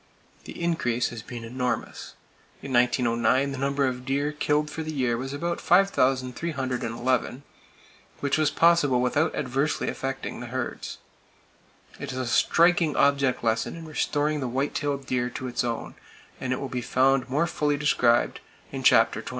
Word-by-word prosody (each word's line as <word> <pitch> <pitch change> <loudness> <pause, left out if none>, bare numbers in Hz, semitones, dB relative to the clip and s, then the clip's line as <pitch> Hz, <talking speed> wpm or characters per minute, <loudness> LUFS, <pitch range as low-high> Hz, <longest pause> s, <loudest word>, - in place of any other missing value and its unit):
The - - -9
increase 125 -9 0
has 120 -2 -7
been 120 0 -8
enormous. 125 +2 -4 0.5
In 135 - -5
1909 125 +2 +2
the 135 - -5
number 140 +1 +1
of 125 -1 -3
deer 140 +3 -1
killed 150 0 0
for 160 - -5
the 155 0 -4
year 130 -5 0
was 130 +3 -4
about 170 +4 -3
5,311, 130 - 0 0.8
which 140 -1 0
was 155 -1 +2
possible 165 -6 +3
without 125 +6 +1
adversely 135 +4 -1
affecting 135 0 -4
the 120 - -7
herds. 125 0 -5 1.0
It - - -5
is 130 - -6
a 130 - -2
striking 165 +5 +3
object 140 -3 +2
lesson 115 +5 0
in 165 -1 -9
restoring 150 -1 -1
the 130 - -2
white 130 +4 -1
tailed 140 -2 -2
deer 125 -1 -1
to 130 - -6
its 125 - -1
own, 120 -2 -3 0.5
and 130 - -3
it 130 - -1
will 135 - -4
be 125 -1 -4
found 130 +1 +2
more 150 +6 +1
fully 150 -3 0
described 125 -5 +2 0.3
in - - -5
chapter - - +4
XXIV. - - -8
135 Hz, 160 wpm, -26 LUFS, 125-150 Hz, 1.0 s, chapter